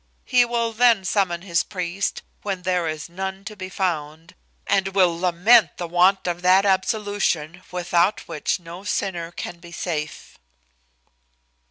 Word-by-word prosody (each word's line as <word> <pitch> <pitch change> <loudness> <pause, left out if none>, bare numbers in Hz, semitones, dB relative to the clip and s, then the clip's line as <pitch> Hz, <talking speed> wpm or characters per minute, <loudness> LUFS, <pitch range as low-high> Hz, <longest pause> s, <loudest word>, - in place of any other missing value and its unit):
He 250 -2 +4
will 235 -1 -1
then 230 -4 +4
summon 175 -2 0
his 170 -3 +1
priest, 180 +1 -3 0.2
when 195 -3 -4
there 180 -2 0
is 155 -1 -4
none 190 +2 -6
to 215 - -7
be 185 -2 -7
found, 165 -3 -3 0.3
and 195 0 0
will 180 -3 +4
lament 185 +6 +4
the 175 - -4
want 180 +3 +3
of 175 0 -2
that 185 +2 +5
absolution, 190 -4 0
without 175 +2 +1
which 165 +3 -2
no 175 +2 -10
sinner 175 -5 -2
can 175 0 -7
be 170 0 -13
safe." 155 -3 -5
180 Hz, 145 wpm, -23 LUFS, 170-195 Hz, 0.3 s, that